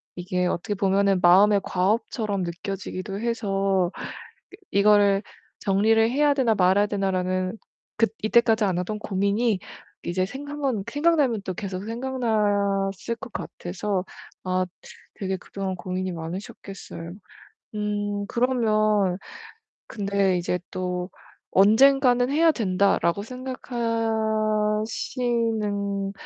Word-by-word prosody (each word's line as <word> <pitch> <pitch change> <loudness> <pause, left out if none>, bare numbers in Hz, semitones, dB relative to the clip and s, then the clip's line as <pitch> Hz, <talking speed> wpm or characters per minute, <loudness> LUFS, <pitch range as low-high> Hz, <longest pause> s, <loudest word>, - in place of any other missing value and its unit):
이게 180 0 -1
어떻게 180 +4 -2
보면 195 0 +2
마음의 195 +3 +6
과업처럼 205 +1 0
느껴지기도 190 +2 -5
해서 195 -5 0 0.6
그 390 - -14
'이거를 200 0 +4 0.4
정리를 220 +3 +3
해야 290 +1 +3
되나 250 -5 +2
말아야 195 +2 +3
되나.'라는 185 -1 -1 0.4
그 225 - +4 0.2
이때까지 225 0 +4
안 185 -2 0
하던 210 +4 -3
고민이 200 +2 0 0.4
이제 185 +2 0
생각만 275 -2 -3
생각나면 290 -7 +2
또 185 - -3
계속 195 -1 -5
생각났을 215 -4 0
것 230 - -10
같아서 185 +2 -3 0.4
아 185 0 0 0.5
되게 190 -1 -3
그동안 190 +1 -5
고민이 185 +1 -3
많으셨겠어요. 170 0 -7 0.6
음 205 -1 -2
그러면 215 -6 +2 0.7
근데 200 -3 +1
이제 180 +1 -1
또 180 0 -3 0.4
'언젠가는 245 +5 +5
해야 320 +2 +4
된다.'라고 195 - +1
생각하시는 220 -3 -1
205 Hz, 250 characters per minute, -25 LUFS, 190-225 Hz, 0.7 s, 마음의